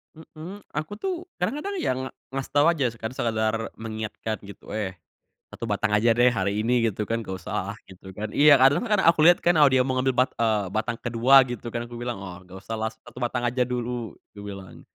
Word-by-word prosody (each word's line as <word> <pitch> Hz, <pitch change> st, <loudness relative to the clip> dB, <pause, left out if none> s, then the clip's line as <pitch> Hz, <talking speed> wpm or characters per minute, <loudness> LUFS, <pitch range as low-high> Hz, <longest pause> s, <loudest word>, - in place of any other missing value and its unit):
Mhm, 160 Hz, +5 st, -10 dB
aku 155 Hz, +6 st, -4 dB
tuh 370 Hz, -, -3 dB, 0.3 s
kadang-kadang 295 Hz, -, -2 dB
ya -, -, +1 dB, 0.4 s
ngasih 135 Hz, 0 st, -5 dB
tau 145 Hz, +3 st, +5 dB
aja 150 Hz, -6 st, +1 dB
sekedar 110 Hz, -1 st, -1 dB, 0.2 s
mengingatkan 110 Hz, 0 st, -5 dB
gitu, 100 Hz, -, -12 dB
"Eh, 105 Hz, -3 st, -3 dB, 0.6 s
1 115 Hz, -, -6 dB
batang 105 Hz, +1 st, 0 dB
aja 110 Hz, +3 st, +3 dB
deh 125 Hz, 0 st, +5 dB
hari 100 Hz, -1 st, -1 dB
ini," 120 Hz, -1 st, +3 dB
gitu 105 Hz, +1 st, -4 dB
kan, 115 Hz, +2 st, -2 dB
gak 95 Hz, -3 st, -5 dB
usah -, -, -3 dB
gitu 95 Hz, 0 st, -13 dB
kan 105 Hz, +3 st, -6 dB
iya 145 Hz, -1 st, +7 dB
karena 190 Hz, -, +3 dB
aku 165 Hz, -2 st, +5 dB
liat 175 Hz, +2 st, +7 dB
kan 175 Hz, -, +2 dB
kalau 150 Hz, -3 st, +6 dB
dia 130 Hz, -1 st, +3 dB
mau 130 Hz, -, -1 dB
ngambil 130 Hz, -1 st, 0 dB
bat -, -, -26 dB
eee, 110 Hz, -4 st, +1 dB
batang 115 Hz, +2 st, -1 dB
ke-2 125 Hz, +3 st, +5 dB
gitu 120 Hz, -1 st, -6 dB
kan 120 Hz, 0 st, -4 dB
aku 120 Hz, -, -12 dB
bilang, 120 Hz, -3 st, -3 dB
"Wah 90 Hz, -2 st, -9 dB
gak 95 Hz, +1 st, -12 dB
usahlah 110 Hz, +3 st, -3 dB, 0.2 s
1 125 Hz, -, -11 dB
batang 120 Hz, 0 st, -1 dB
aja 125 Hz, +2 st, 0 dB
dulu," 120 Hz, -2 st, -4 dB, 0.2 s
kubilang, 100 Hz, -2 st, -9 dB
120 Hz, 195 wpm, -25 LUFS, 110-135 Hz, 0.6 s, iya